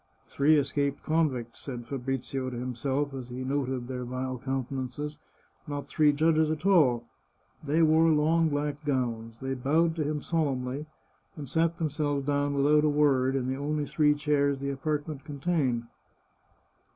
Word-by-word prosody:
" - - -39
Three 150 +2 +3
escaped 140 0 0
convicts," 140 -8 0
said 125 -4 -6
Fabrizio 135 0 -3
to 125 - -6
himself, 130 +3 -2
as 130 -2 -7
he 125 +1 -5
noted 130 -2 -2
their 125 -1 -4
vile 130 +1 -4
countenances, 135 +3 -4 0.2
" - - -37
not 145 -1 -4
three 150 -1 +4
judges 155 +1 +3
at 155 +2 -3
all." 135 -12 +4 0.6
They 155 +3 +2
wore 160 +1 +5
long 160 +2 +3
black 145 0 -2
gowns; 115 -5 -2
they 135 0 -2
bowed 155 +6 +1
to 155 - +1
him 150 0 -2
solemnly, 140 -3 -1 0.5
and 145 -3 -7
sat 165 +4 +1
them 160 -4 -1
selves 145 -2 -1
down 145 0 0
without 150 +2 +4
a 155 - +4
word, 135 -3 +3
in 130 -2 -1
the 130 +1 -2
only 150 +1 -1
three 150 +1 +3
chairs 145 -1 +1
the 140 +1 -3
apartment 145 +1 -3
contained. 140 -5 -1
140 Hz, 165 wpm, -28 LUFS, 130-150 Hz, 0.6 s, wore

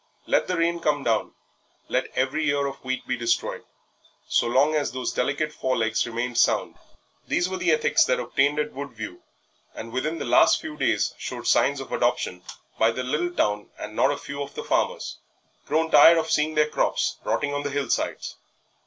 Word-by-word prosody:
Let - - +1
the 180 - -1
rain 170 +1 +1
come 150 -3 0
down, 115 -3 0 0.5
let - - 0
every 135 +4 0
ear 140 0 +1
of 135 0 -6
wheat 130 0 -3
be 125 - -1
destroyed, 120 -1 -1 0.6
so - - +2
long 135 +6 +3
as 150 -2 0
those 130 0 -3
delicate 145 +4 -1
fore 130 -3 -1
legs 110 +1 0
remained 120 +1 -2
sound. - - +1 0.5
These 175 - +1
were 190 0 -4
the - - 0
ethics 470 +1 +3
that - - +1
obtained 145 +2 +1
at 150 - -2
Woodview, 115 -9 -7 0.6
and 115 +1 -8
within 155 +6 -2
the - - -4
last - - +5
few 315 -1 -7
days - - 0
showed - - -6
signs 140 0 +3
of 135 - -8
adoption 120 -7 0 0.4
by 110 - +5
the 125 +3 -3
little 150 +7 -1
town 105 -11 -1
and 105 - -8
not 130 - +3
a 145 - -2
few 140 0 -7
of 140 0 -7
the - - -5
farmers, - - -1 0.5
grown 160 +1 +1
tired 165 +1 +8
of 160 0 -1
seeing 155 +1 +1
their 150 0 +3
crops - - 0
rotting 145 0 -1
on 145 - -1
the 145 - -3
hill 140 0 -2
sides. - - -2
140 Hz, 195 wpm, -25 LUFS, 125-155 Hz, 0.6 s, tired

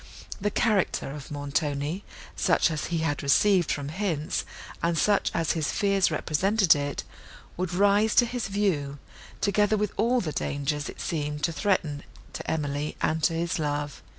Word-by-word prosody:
The 205 - +1
character 205 -9 +1
of 145 -1 -8
Montoni, 145 +4 -2 0.3
such - - +3
as 150 -3 -2
he 170 - -2
had 145 -2 -1
received 175 +5 +3
from 145 -1 -3
hints, 160 -4 -2 0.4
and 170 0 +1
such 205 +2 +3
as 165 -2 0
his 160 -2 -1
fears 195 -2 +2
represented 185 +5 +3
it, 145 -1 -3 0.5
would 180 -1 -2
rise 205 +4 +3
to 240 - +6
his 240 -2 -3
view, 180 -9 0 0.4
together 205 +1 +2
with 210 -1 -1
all 240 +4 +3
the 165 -9 -2
dangers 145 +1 -2
it - - -10
seemed 150 -2 -3
to 170 - +2
threaten 165 -5 0 0.3
to - - -5
Emily 145 -1 -2
and 160 0 0
to 165 - +3
his 165 +1 -1
love. 145 -1 -2
165 Hz, 160 wpm, -27 LUFS, 145-200 Hz, 0.5 s, to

